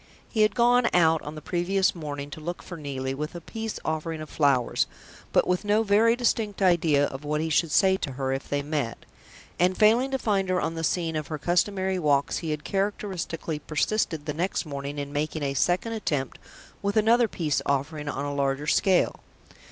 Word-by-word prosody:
He 220 - -1
had 215 -2 +3
gone 245 0 +4
out 160 -2 +4
on 150 +1 -7
the 155 - -9
previous 185 +3 +1
morning 145 -3 -6
to 155 - -7
look 175 +3 -5
for 175 - -8
Neelie 135 -4 -4
with 150 +4 -5
a - - -4
peace 220 +6 -5
offering 160 0 -2
of 155 -1 -8
flowers, 140 -5 +2 0.4
but - - +3
with 180 +2 0
no 210 +2 +2
very 220 +3 +4
distinct 225 -4 0
idea 165 -6 +3
of 135 +1 -6
what 150 +1 -1
he 160 +1 -2
should 165 +1 +2
say 190 +4 +4
to 140 -7 -4
her 130 0 -2
if 135 - -5
they 145 0 -1
met; 145 -6 -3 0.5
and 180 +1 +3
failing 230 +5 +4
to 270 - 0
find 200 -6 0
her 185 0 +2
on 165 - -1
the 165 0 -4
scene 165 -1 0
of 155 -1 -3
her 155 - -4
customary 185 +4 +1
walks, 145 -3 +1
he 165 - -5
had 150 -1 -3
characteristically 190 -5 -2
persisted 160 0 -1
the 150 - -2
next 175 +4 -1
morning 140 -1 -5
in 145 0 -5
making 155 +1 -2
a 140 -1 -1
second 180 - +1
attempt 145 - -2 0.4
with 200 +1 -1
another 230 +2 +4
peace 150 -9 -1
offering 145 +2 -1
on 145 - -3
a 145 - -3
larger 140 0 0
scale. 185 +4 +2
165 Hz, 200 wpm, -26 LUFS, 145-195 Hz, 0.5 s, gone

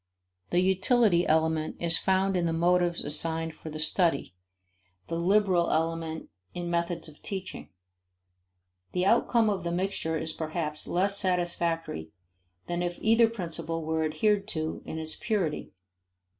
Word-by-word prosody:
The 175 - +2
"utility" 190 0 +3
element 160 0 +1
is 170 -1 +5
found 190 0 +1
in 175 -2 +1
the 165 - -1
motives 175 +1 +2
assigned 160 +2 +1
for 160 - -10
the 155 - -6
study, 160 - +1 0.8
the 165 - -2
"liberal" 185 -1 +2
element 165 - -2 0.2
in 175 -1 -4
methods 170 -1 -1
of 155 -1 -15
teaching. 190 -3 -6 1.2
The 180 0 0
outcome 230 +1 +3
of 200 -4 -1
the 170 - -2
mixture 175 -3 -1
is 160 0 -3
perhaps 155 -1 -3
less 195 +3 +1
satisfactory 170 - -1 0.6
than 175 0 -3
if 175 0 -2
either 225 +1 +4
principle 165 -6 -4
were 160 0 0
adhered 200 +6 +1
to 160 -6 -3
in 160 - -6
its 160 0 -3
purity. 195 -9 -2
170 Hz, 140 wpm, -28 LUFS, 160-190 Hz, 1.2 s, is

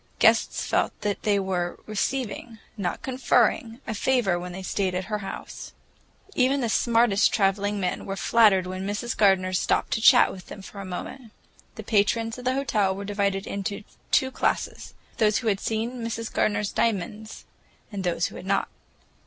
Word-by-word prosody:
Guests - - +3
felt - - 0
that 205 -1 -2
they 205 -1 +2
were 185 -3 -2
receiving, 225 +1 -3 0.2
not 195 -5 -3
conferring, 240 -2 +1
a 220 - -3
favor 215 -6 +1
when 180 0 -6
they 190 +2 -7
stayed 185 -1 -1
at 185 - -1
her 210 - 0
house. 195 - -8 0.6
Even 270 -2 +2
the 240 -3 -1
smartest 230 -2 +3
traveling 200 0 +1
men 180 -2 -2
were 195 - -3
flattered 205 -3 +4
when 185 +1 -5
Mrs. 210 +4 -3
Gardener 190 -3 +3
stopped 180 - +1
to 220 - 0
chat 245 +1 +7
with 185 -2 -11
them 195 - -9
for 200 - -10
a 195 - -6
moment. 220 +6 -7 0.4
The - - -7
patrons 225 +2 +1
of 250 - -10
the 255 +1 +1
hotel 210 -8 +1
were 200 +1 -6
divided 200 -1 -1
into 200 +1 -4 0.3
two 265 0 +3
classes; - - -2 0.2
those 215 -3 +3
who 235 - -3
had 195 -2 0
seen 230 +3 -3
Mrs. 230 0 -4
Gardener's 210 -1 0
diamonds, 215 0 -2 0.5
and 200 -2 -4
those 175 -1 0
who - - -6
had - - -9
not. 195 0 +1
205 Hz, 175 wpm, -25 LUFS, 195-230 Hz, 0.6 s, chat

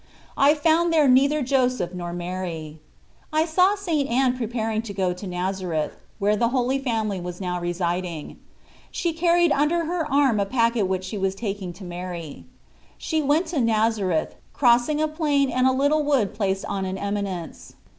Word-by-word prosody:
I 285 +2 +5
found 330 +3 +2
there 310 -3 +4
neither 280 +3 +4
Joseph 250 -8 0
nor 175 -1 -5
Mary. 175 -3 -5 0.5
I 310 +1 +2
saw 365 +5 +3
St. 330 -9 -1
Anne 255 +1 +2
preparing 225 -2 -2
to 215 -3 -8
go 185 -2 0
to 180 +3 -8
Nazareth, 180 -3 -2 0.2
where 205 +1 +2
the 235 +3 +2
Holy 255 +2 0
Family 220 -7 -2
was 175 0 -6
now 180 -2 -2
residing. 175 -2 -3 0.5
She 340 -2 -2
carried 340 0 +3
under 325 +4 +2
her 330 -2 -2
arm 270 -6 +3
a 200 - +1
packet 230 -3 +1
which 185 0 -2
she 195 +2 -5
was 190 0 0
taking 195 -3 -4
to 185 +3 -12
Mary. 175 - -7 0.5
She 315 -1 -1
went 300 +5 +2
to 285 - +1
Nazareth, 220 -6 +1 0.2
crossing 245 +3 +3
a 310 - +2
plain 295 -4 +1
and 255 +1 +2
a - - +4
little 285 +4 +2
wood 275 -9 +1
placed 195 -2 -1
on 195 -1 -3
an 190 0 -3
eminence. 200 -4 -4
225 Hz, 170 wpm, -24 LUFS, 185-285 Hz, 0.5 s, I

